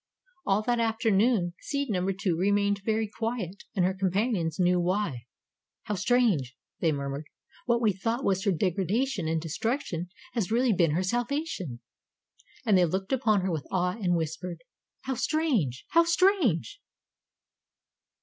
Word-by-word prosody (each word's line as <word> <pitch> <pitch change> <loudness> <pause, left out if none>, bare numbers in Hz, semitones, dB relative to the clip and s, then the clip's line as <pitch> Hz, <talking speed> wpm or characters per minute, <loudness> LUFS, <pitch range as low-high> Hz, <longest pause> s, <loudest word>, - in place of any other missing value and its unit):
All 200 +2 +2
that 240 +1 +1
afternoon 225 -4 +2
seed 280 -4 -2
number 185 0 0
Two 190 -2 -1
remained 200 +2 +1
very 220 0 0
quiet 210 -3 -4
and 185 -3 +3
her 190 - +1
companions 190 -3 0
knew 180 0 +3
why. 175 - -1 0.6
"How 210 - -3
strange!" 195 - +1 0.2
they 165 - +2
murmured. 140 +1 -4 0.4
"What 235 0 +2
we 210 -3 +4
thought 225 +7 -2
was 190 -1 +1
her 200 - +2
degradation 190 - 0
and 160 0 +1
destruction 175 - -2 0.2
has 220 -7 -1
really 240 0 +3
been 170 -5 +2
her 180 - +1
salvation." 235 - -2 0.8
And 215 -4 +4
they 180 - +5
looked 190 - -2
upon 220 -6 +2
her 185 0 -1
with 155 -5 -3
awe 180 -1 +1
and 185 -6 0
whispered: 165 +2 -4 0.4
"How 265 - -2
strange! 245 - 0
How 335 - +5
strange!" 360 - +2
195 Hz, 145 wpm, -28 LUFS, 175-235 Hz, 0.8 s, they